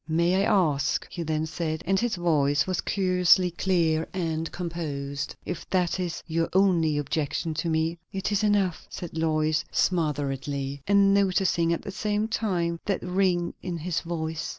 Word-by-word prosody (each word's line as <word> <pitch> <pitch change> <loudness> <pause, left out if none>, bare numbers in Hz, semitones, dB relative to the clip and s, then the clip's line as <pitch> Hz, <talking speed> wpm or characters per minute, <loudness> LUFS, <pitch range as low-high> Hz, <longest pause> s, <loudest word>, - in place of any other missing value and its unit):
"May 170 +3 +2
I - - +3 0.3
ask," 140 0 -1
he 175 - -5
then 155 -1 -1
said, 160 0 -3
and 195 +2 +2
his 240 -1 0
voice 145 -5 +2
was 185 -2 -1
curiously 180 -2 +3
clear 165 -3 +1
and 165 -3 -2
composed, 145 -5 -4
"if 175 - -6
that 180 -1 +1
is 175 -2 -3
your 165 0 -1
only 175 -6 +3
objection 155 +2 -1
to 170 - -2
me?" 160 +1 0
"It 195 +1 -2
is 205 0 +1
enough!" 200 -5 +1
said 175 -3 -7
Lois 155 0 +1
smotheredly, 140 -4 -1
and 200 0 +5
noticing 185 -4 +2
at 170 - -1
the 200 - -5
same 210 +2 -1
time 175 -7 -1
that 195 -3 -1
ring 180 -1 +1
in 175 -2 -4
his 165 +1 -2
voice. 160 -2 -4
170 Hz, 160 wpm, -26 LUFS, 155-185 Hz, 0.3 s, and